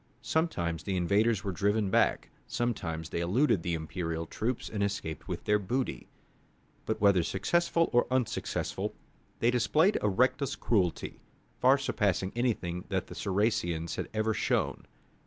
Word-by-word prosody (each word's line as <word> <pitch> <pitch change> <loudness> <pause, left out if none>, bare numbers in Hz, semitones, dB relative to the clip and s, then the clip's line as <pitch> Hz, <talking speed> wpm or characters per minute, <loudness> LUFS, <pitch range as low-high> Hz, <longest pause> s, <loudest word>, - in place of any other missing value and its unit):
Sometimes 85 - 0
the 95 +4 -2
invaders 105 +4 +2
were 100 - -2
driven 100 +2 +1
back, - - +2 0.2
sometimes 85 -9 -2
they - - -3
eluded 95 - +2
the 85 0 -1
imperial 80 0 -3
troops 115 +8 -3
and 105 - -4
escaped 100 -6 -3
with - - -4
their 105 0 +3
booty. 125 +7 -2 0.8
But - - -1
whether 100 -3 +5
successful 165 - +1
or 120 - +4
unsuccessful, 130 -3 -1 0.5
they 120 - +4
displayed 150 - +3
a 105 - +2
reckless 125 +6 +1
cruelty, 95 -7 0 0.4
far 130 +2 +5
surpassing 100 -8 0
anything 95 -8 -1
that - - -1
the - - -10
Saracens 95 -5 0
had - - -4
ever 110 0 0
shown. - - -1
105 Hz, 140 wpm, -30 LUFS, 90-120 Hz, 0.8 s, whether